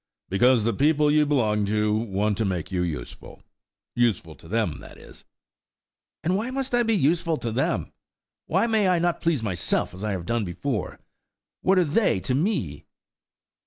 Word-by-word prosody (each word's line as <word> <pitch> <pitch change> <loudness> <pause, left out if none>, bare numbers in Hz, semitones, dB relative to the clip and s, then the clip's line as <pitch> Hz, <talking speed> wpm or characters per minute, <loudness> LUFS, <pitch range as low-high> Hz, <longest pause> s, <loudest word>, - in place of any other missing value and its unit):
"Because 120 +4 +4
the 115 +1 +1
people 150 +1 +3
you 150 0 +3
belong 110 -7 +1
to 105 +1 +1
want 105 -1 0
to - - +2
make 90 -2 -3
you 90 -1 0
useful–useful 100 +4 -4
to 80 - -16
them, 105 -4 -1
that - - -13
is." - - -14 1.0
"And 180 +3 +1
why 220 +5 -2
must 265 0 -3
I 240 - +4
be 225 -1 +2
useful 165 -1 +1
to 115 - -3
them? 125 +5 -1 0.6
Why - - +2
may 220 -4 +2
I 180 -1 +3
not 175 0 0
please 160 -8 0
myself 90 -5 -1
as 95 +3 -9
I 105 -1 -1
have 90 -3 -4
done 115 +1 0
before? 100 +5 -3 0.6
What 190 +1 +3
are 180 - +5
they 160 - +2
to 130 - -2
me?" 125 - -1
115 Hz, 170 wpm, -25 LUFS, 100-165 Hz, 1.0 s, are